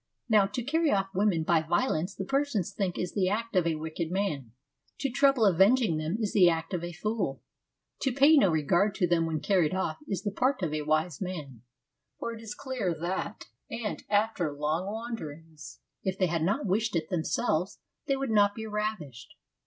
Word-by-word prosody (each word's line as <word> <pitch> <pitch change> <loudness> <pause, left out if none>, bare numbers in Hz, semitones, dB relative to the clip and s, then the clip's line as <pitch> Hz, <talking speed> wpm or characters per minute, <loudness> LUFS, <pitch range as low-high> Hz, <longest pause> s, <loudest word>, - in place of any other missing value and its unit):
Now 210 -4 +4
to 220 +5 -4
carry 320 +4 +1
off 195 -1 0
women 195 -5 +2
by 165 0 +3
violence 175 +1 0
the 190 - -4
Persians 275 - 0
think 190 -4 -2
is 180 - -3
the 190 -3 +1
act 230 +2 -2
of 180 -2 +3
a 165 - +1
wicked 160 +1 -4
man; 160 - -2 0.5
to 275 -2 -2
trouble 275 -3 +4
about 195 - +5
avenging 195 0 +4
them 155 +6 -2
is 215 -3 -1
the 180 -4 +6
act 165 +1 -2
of 175 -2 -2
a 175 - -4
fool; 195 -6 -3 0.6
to 270 - 0
pay 280 +5 +6
no 235 -10 +5
regard 175 +6 +2
to 190 - +2
them 165 -1 +2
when 155 -2 -2
carried 185 -4 +2
off 175 -4 -2
is 195 -4 -3
the 205 - -1
part 255 +1 0
of 155 -3 -1
a 155 - -1
wise 155 +2 0
man; 150 - -6 0.6
for 235 - -4
it 225 - -9
is 215 -2 -7
clear 230 -10 -2
that, 185 +5 -3 0.2
if 230 -2 -5 2.1
they 190 - +3
had 165 -1 -1
not 200 +6 0
wished 210 +2 0
it 160 -1 -1
themselves, 180 +1 -1 0.3
they 275 - +2
would 270 -3 -2
not 205 -1 +4
be 220 - -5
ravished. 210 - -4
195 Hz, 185 wpm, -29 LUFS, 165-220 Hz, 2.1 s, the